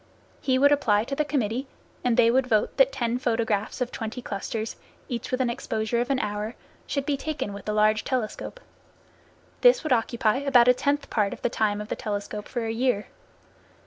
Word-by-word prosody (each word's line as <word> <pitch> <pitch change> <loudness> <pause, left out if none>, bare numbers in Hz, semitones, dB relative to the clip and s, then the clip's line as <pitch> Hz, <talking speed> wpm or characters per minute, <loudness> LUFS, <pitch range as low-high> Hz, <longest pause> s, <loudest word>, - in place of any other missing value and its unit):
He 260 -1 +2
would 285 +2 +5
apply 220 -8 +3
to 275 +4 -4
the 300 - +1
committee, 260 -3 -1 0.4
and 245 -2 +2
they 230 0 +6
would 260 +1 +2
vote 215 -4 +1
that 270 -1 +5
ten 240 -2 -1
photographs 225 -2 -1
of 250 - -1
twenty 225 +2 -5
clusters, 220 0 -4 0.3
each 240 -1 -4
with 255 0 0
an 250 - +1
exposure 235 -2 -1
of 245 - -3
an 275 - +2
hour, 210 0 -3 0.3
should 280 -2 -2
be 290 - +1
taken 280 -7 -4
with 200 -1 -9
the 210 - -1
large 215 0 +3
telescope. 255 - -3 1.0
This - - +6
would 310 -4 +2
occupy 230 -1 +1
about 270 -3 +4
a 250 - +8
tenth 285 +3 -1
part 205 -3 +1
of - - -11
the - - +2
time 210 -2 +1
of 210 0 -6
the - - -1
telescope 210 -2 -4
for 240 -3 -3
a 225 - -1
year. 230 -3 0
235 Hz, 200 wpm, -26 LUFS, 215-265 Hz, 1.0 s, a